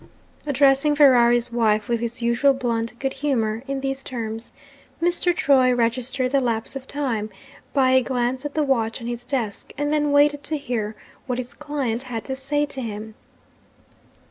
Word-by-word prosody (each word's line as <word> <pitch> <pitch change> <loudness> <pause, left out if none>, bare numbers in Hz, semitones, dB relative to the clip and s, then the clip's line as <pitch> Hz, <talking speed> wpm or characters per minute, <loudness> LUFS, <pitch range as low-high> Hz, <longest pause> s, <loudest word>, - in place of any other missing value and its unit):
Addressing 280 +1 +4
Ferrari's 240 -5 +5
wife, 215 -3 +1
with 235 -1 0
his 235 +1 -4
usual 235 +4 +3
blunt 235 -2 -2
good 270 +1 -2
humour, 230 -6 -1
in 275 0 -3
these 270 0 -3
terms, 225 -2 -5 0.5
Mr. 350 +1 +2
Troy 270 -7 +3
registered 250 +2 0
the 275 -1 +3
lapse 230 0 -1
of 265 -1 -7
time 245 -7 -2 0.4
by 265 -2 +3
a 260 0 +5
glance 255 +1 -1
at 290 -1 -5
the 310 - +2
watch 230 -5 0
on 235 - -8
his 240 0 -4
desk, 240 -6 -3
and 290 +1 0
then 295 -1 +1
waited 290 0 +4
to 310 - 0
hear 225 -6 -3 0.3
what 250 -2 -1
his 255 -1 -5
client 280 -6 -3
had 230 -2 -4
to 265 - -3
say 290 +2 0
to 270 -2 -5
him. 220 -1 -6
255 Hz, 170 wpm, -23 LUFS, 235-280 Hz, 0.5 s, Ferrari's